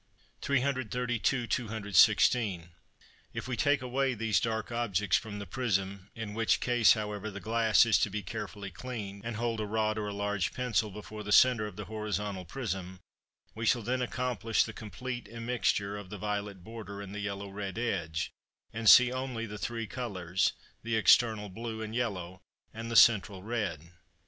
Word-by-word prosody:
332 125 -2 0
(216). 105 -3 +3 0.7
If - - -4
we 130 - -2
take 145 +1 +2
away 130 +1 0
these 110 -2 +1
dark 110 0 -2
objects 105 -6 +1
from 105 -2 -2
the 100 - -6
prism, 100 -6 -2
in 110 -2 -5
which 115 0 +2
case, 120 -3 +5
however, 105 -1 -4
the 100 -1 -7
glass 110 +2 +4
is 115 -3 +4
to - - +2
be 105 +1 -4
carefully 100 +2 -6
cleaned, 100 0 -7
and 115 -1 -4
hold 115 0 -1
a 105 - -1
rod 110 0 0
or 105 - -3
a - - -3
large 100 -2 -1
pencil 115 -3 0
before 105 +1 -8
the 105 - -5
centre 115 -1 +5
of 105 - -10
the 105 - -6
horizontal 105 -3 -3
prism, 95 -4 -5 0.5
we 115 - -6
shall 120 0 +3
then 125 +4 -1
accomplish 125 -2 0
the 110 - -6
complete 120 +4 -6
immixture 115 -3 -1
of 100 -3 -10
the 105 - -6
violet 100 -2 -4
border 105 -2 -8
and 100 -1 -7
the 105 - -5
yellow 100 -1 -4
red 100 0 -5
edge, 85 -10 -2 0.4
and 115 -1 +3
see 125 0 +9
only 130 -3 -3
the 105 -1 -7
three 115 0 -3
colours, 95 -6 -1 0.3
the 115 0 -1
external 110 +1 +4
blue, 110 +3 -6
and 110 0 -6
yellow, 95 -7 -3 0.3
and 115 +1 -6
the 115 - -3
central 100 -5 +5
red. 100 -8 -3
110 Hz, 170 wpm, -30 LUFS, 100-120 Hz, 0.7 s, see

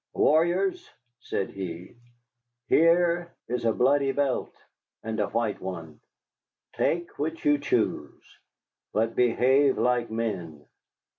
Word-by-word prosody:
"Warriors," 175 +5 +2 0.3
said 95 - -3
he, 90 -1 -7 0.7
"here 170 +1 +3
is 120 0 -3
a 115 - +4
bloody 135 +4 +2
belt 140 -2 -1 0.5
and 110 0 -4
a 105 - +1
white 115 -1 -2
one; 85 -5 -7 0.7
take 170 0 -1
which 160 +2 -3
you 145 -1 +4
choose. 145 - -2 0.5
But 115 +1 0
behave 130 +3 +3
like 125 -1 +1
men. 95 -10 -4
125 Hz, 105 wpm, -26 LUFS, 105-150 Hz, 0.7 s, a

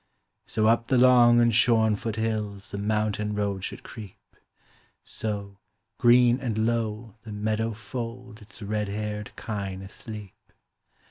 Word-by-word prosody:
So 110 -1 0
up 115 +1 +3
the 130 - +3
long 120 -1 +6
and 120 -1 +4
shorn 110 -1 +4
foot 110 +1 -4
hills 105 -3 -2
The 100 - -4
mountain 105 0 -1
road 100 -2 -2
should - - -6
creep; 105 -4 -10 0.9
So, 100 -2 -5 0.4
green 120 +1 +5
and 110 -4 -1
low, 115 -1 -2
the 110 - -10
meadow 110 +2 -1
fold 115 +2 -7
Its 105 +1 -10
red 105 0 -2
haired 105 +1 -4
kine 100 -3 -5
asleep. 105 0 -9
110 Hz, 135 wpm, -26 LUFS, 105-115 Hz, 0.9 s, long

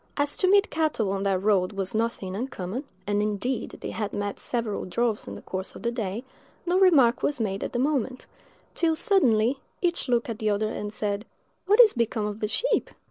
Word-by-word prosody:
As 285 0 +1
to 370 - +2
meet 400 +1 +4
cattle 305 -11 0
on 195 0 -2
that 190 -1 +1
road 200 -2 +2
was 195 -1 -2
nothing 215 -4 -2
uncommon, 235 +1 -4 0.2
and 205 0 +1
indeed 215 +4 -2
they - - -4
had 210 -2 -3
met 205 0 -3
several 230 -4 -2
droves 225 - -1
in 100 - -6
the 100 - -11
course 190 0 -5
of - - -10
the 235 - 0
day, 225 -1 -3 0.4
no 360 +2 +2
remark 285 -11 +5
was 290 -3 0
made 200 -3 -1
at - - -3
the - - -2
moment, 260 -1 0 0.5
till, 325 -2 +2
suddenly, 265 - +3 0.2
each 345 -6 0
looked 240 -1 +2
at 230 -3 -5
the 215 - +1
other 210 +1 +1
and 210 -1 -4
said, 210 -1 -2 0.4
"What 420 +4 +4
is 460 -4 +8
become 235 -3 0
of 210 0 -4
the 210 - -1
sheep?" - - 0
225 Hz, 205 wpm, -26 LUFS, 205-275 Hz, 0.5 s, is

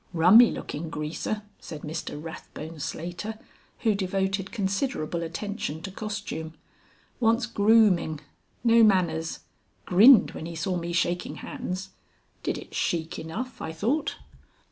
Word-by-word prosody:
"Rummy 185 +9 +8
looking 160 +2 -5
greaser," 155 +8 -3 0.2
said 155 -3 -9
Mr 155 -1 -5
Rathbone 160 0 -8
Slater, 175 +9 -5 0.4
who 225 -3 +3
devoted 195 0 -1
considerable 195 - -1
attention 170 -1 -4
to 195 - -5
costume. 205 -6 -5 0.6
"Wants 230 +1 +3
grooming. 205 -8 +3 0.4
No 230 -1 +6
manners. 170 -6 +2 0.4
Grinned 220 +7 +7
when 160 - -6
he 170 - -7
saw 170 +4 -1
me 170 0 -3
shaking 175 0 0
hands. 185 +1 -5 0.5
Did - - -2
it - - -11
chic 165 0 -1
enough, 225 +11 -6
I 160 - -4
thought." 235 - 0
185 Hz, 120 wpm, -27 LUFS, 160-215 Hz, 0.6 s, Rummy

